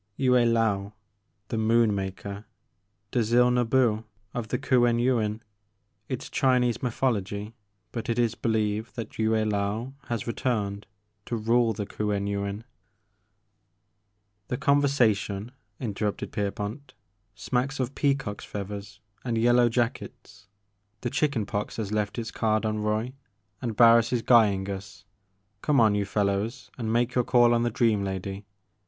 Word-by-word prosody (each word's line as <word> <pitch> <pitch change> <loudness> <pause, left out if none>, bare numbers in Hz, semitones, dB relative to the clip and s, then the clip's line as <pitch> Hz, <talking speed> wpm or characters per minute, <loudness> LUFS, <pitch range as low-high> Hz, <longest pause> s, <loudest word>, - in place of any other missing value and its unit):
'*Yue 130 -2 +2
Laou, 115 -5 +2 0.3
— 100 0 -47
^the 115 - -1
Moon 115 0 +3
Maker, 100 +1 -5 0.7
Dzil 120 +1 +3
Nbu 115 -2 +2 0.3
of 120 -2 -3
the - - -1
Kuen 120 -2 +3
Yuin; 115 -3 +1 0.3
— 100 - -47
^it - - -3
's - - -9
Chinese 125 -3 +2
Mythology, 110 -4 -1 0.4
but 115 -1 -5
it 115 - 0
is 120 -2 +2
believed 110 -1 -1
that 115 -2 -7
Yue 110 0 +2
Laou 110 +2 0
has 115 -4 -3
returned 105 -4 -2 0.4
to 120 - -2
rule 115 +1 +2
the 105 0 -4
Kuen 105 0 -2
Yuin 100 +1 -3 0.9
*' 100 0 -48
The 125 - -2
conversation,'* 120 -8 +2 0.3
interrupted 105 -3 -3
Pierpont, 105 +7 -4 0.4
smacks 130 +5 -2
of 130 +1 -1
peacocks 135 -8 -1
feathers 100 0 -7 0.2
and 120 -2 -1
yellow 120 +1 +4
jackets. 115 -4 -3 0.5
The 120 - -2
chicken 140 -8 0
pox 105 +1 -4
has 105 -3 -3
left 105 0 -1
its 115 -1 -4
card 110 -1 0
on 110 0 -1
Roy, 110 +4 -1 0.5
and 115 -4 -3
Barris 115 0 +6
is 120 -2 0
guying 105 -5 +4
us. 95 +1 -7 0.6
Come 150 -2 +2
on, 110 -3 +5
you 100 -1 0
fellows, 105 +4 -1
and 115 -3 -3
make 120 +2 +1
your 125 - +2
call 120 -1 +4
on 120 - +2
the 120 - +1
dream 110 -3 +2
lady. 95 +1 -5
110 Hz, 145 wpm, -27 LUFS, 100-120 Hz, 0.9 s, Barris